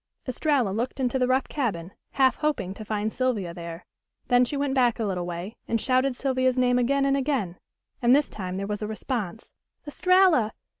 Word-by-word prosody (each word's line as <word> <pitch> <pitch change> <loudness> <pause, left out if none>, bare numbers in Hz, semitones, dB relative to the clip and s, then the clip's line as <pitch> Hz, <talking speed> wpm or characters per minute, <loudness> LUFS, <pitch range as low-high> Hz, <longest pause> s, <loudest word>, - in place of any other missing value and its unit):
Estralla 260 -2 +1
looked 235 +6 -3
into 260 0 0
the 250 - +2
rough 260 +1 +1
cabin, 195 - -3 0.2
half 265 -1 +3
hoping 295 -12 -1
to 215 - -9
find 215 0 -2
Sylvia 225 -9 -1
there. 170 -1 -8 0.4
Then 245 0 +5
she 285 - -4
went 280 -1 0
back 245 -3 +3
a 225 - 0
little 180 -3 -2
way 175 +5 -6
and 230 - 0
shouted 255 +2 +1
Sylvia's 255 -1 0
name 250 0 +3
again 275 +3 +2
and 275 0 +2
again, 260 -11 -1 0.4
and 245 +1 +5
this 290 0 +2
time 185 -2 -5
there 195 - -3
was 210 +1 -4
a 210 - -2
response. 220 -1 -4 0.3
"Estralla! 360 - +3
245 Hz, 190 wpm, -26 LUFS, 205-270 Hz, 0.4 s, Then